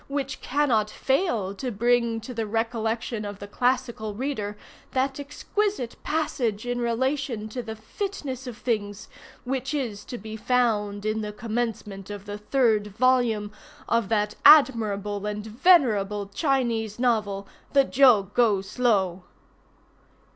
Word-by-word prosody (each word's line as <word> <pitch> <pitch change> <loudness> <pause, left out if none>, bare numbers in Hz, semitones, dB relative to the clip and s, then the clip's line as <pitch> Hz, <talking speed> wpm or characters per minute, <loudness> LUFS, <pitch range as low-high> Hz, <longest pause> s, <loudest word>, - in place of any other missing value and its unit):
which 275 -1 -3
cannot 250 -7 +1
fail 245 - 0
to 250 +6 -4
bring 235 +1 +1
to 230 +3 -8
the 225 -2 -2
recollection 225 0 -2
of 205 -1 -6
the 200 - -8
classical 240 -2 -1
reader 215 -5 -3 0.4
that 270 +1 0
exquisite 290 - -2
passage 245 -8 -1
in 245 0 -2
relation 240 -1 -1
to 245 +3 -5
the 220 -1 -6
fitness 265 - -5
of 240 -3 -7
things, 210 -4 -2 0.4
which 265 +2 -2
is 225 -8 -3
to 245 - -7
be 220 +1 -8
found 215 -4 0
in 215 0 0
the 210 -1 -4
commencement 215 -3 -4
of 205 -1 -7
the 205 0 -6
third 220 -2 +2
volume 240 -5 +2 0.4
of 230 -3 +1
that 210 -1 +1
admirable 210 -8 +5
and 210 0 -4
venerable 220 - +3
Chinese 230 -4 0
novel 210 -5 0 0.3
the 275 -1 +6
Jo 255 -6 +5
Go 220 -5 +3
Slow. 195 -4 0
230 Hz, 135 wpm, -25 LUFS, 210-255 Hz, 0.4 s, the